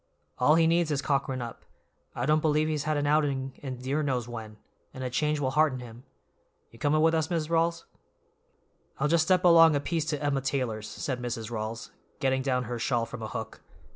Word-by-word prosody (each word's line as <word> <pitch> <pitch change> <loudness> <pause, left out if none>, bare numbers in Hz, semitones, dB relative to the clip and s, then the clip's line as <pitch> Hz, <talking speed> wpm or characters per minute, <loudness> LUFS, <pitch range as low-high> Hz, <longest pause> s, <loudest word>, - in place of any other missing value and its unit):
All 150 +5 +5
he 165 0 +4
needs 165 0 +2
is 145 -2 0
cockerin' 135 -3 -1
up; 115 - -9 0.5
I 120 - -2
don't 155 +2 +3
believe 155 0 +2
he's 155 -1 -2
had 155 -1 0
an 145 - 0
outing 140 -3 +1
in 130 -3 -5
dear 135 +5 -1
knows 130 -5 -1
when, 110 -3 -8 0.4
and 130 - -6
a 125 - -3
change 150 +3 0
will 130 -2 0
hearten 150 -2 +2
him. 120 0 -11 0.7
You 115 - -17
coming 150 +4 +2
with 165 0 +4
us, 160 -1 0
Mis' 165 -3 -1
Rawls?" 165 0 +1 1.1
"I'll 150 - +2
just 160 0 +3
step 185 0 +3
along 165 -2 +7
a - - +2
piece 160 +2 -2
to 150 -2 -2
Emma 140 -2 +1
Taylor's," 125 -6 -2
said 125 -2 -4
Mrs. 120 -2 -4
Rawls, 110 0 -5 0.3
getting 130 -1 +1
down 130 -2 0
her 120 0 -5
shawl 120 -1 0
from 115 0 -8
a 110 - -4
hook. 100 - -6
140 Hz, 205 wpm, -28 LUFS, 125-155 Hz, 1.1 s, along